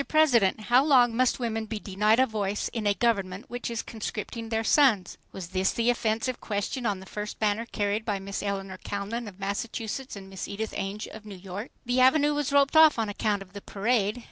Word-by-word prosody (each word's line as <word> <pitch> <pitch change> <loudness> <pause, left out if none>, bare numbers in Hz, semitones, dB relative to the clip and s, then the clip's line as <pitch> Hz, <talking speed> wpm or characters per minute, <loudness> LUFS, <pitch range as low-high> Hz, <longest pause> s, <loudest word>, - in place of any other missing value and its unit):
PRESIDENT, 245 -11 +3
HOW 245 +4 +4
LONG 250 -6 +4
MUST 255 +1 +2
WOMEN 225 -2 -2
BE 220 - -4
DENIED 210 +3 +2
A - - +5
VOICE 205 -4 -2
IN 220 -3 -3
A 200 - +3
GOVERNMENT 200 -3 0
WHICH 245 0 -4
IS 230 -1 -3
CONSCRIPTING 225 +1 -5
THEIR 225 0 0
SONS? 225 - +3
was 180 -3 -7
the 195 +6 +1
offensive 230 +1 -1
question 220 +4 -2
on 200 -3 -1
the 190 - -11
first 210 +1 -6
banner 215 +2 0
carried 205 0 -1
by 210 -3 -1
Miss 195 +1 -5
Eleanor 195 -2 -4
Calnan 210 +4 -4
of 200 -2 -11
Massachusetts 220 +5 -4
and 195 -1 -9
Miss 190 -1 -6
Edith 215 +2 -4
Ainge 200 +2 -3
of 220 - -10
New 205 -3 -9
York. 195 +5 -7 0.2
The 245 +1 +1
Avenue 290 +3 +5
was 290 -2 -1
roped 280 +1 +3
off 315 -3 +7
on 220 -2 -1
account 205 -1 -1
of 185 -1 -23
the 200 - -8
parade. 210 +2 0
215 Hz, 205 wpm, -27 LUFS, 200-240 Hz, 0.2 s, off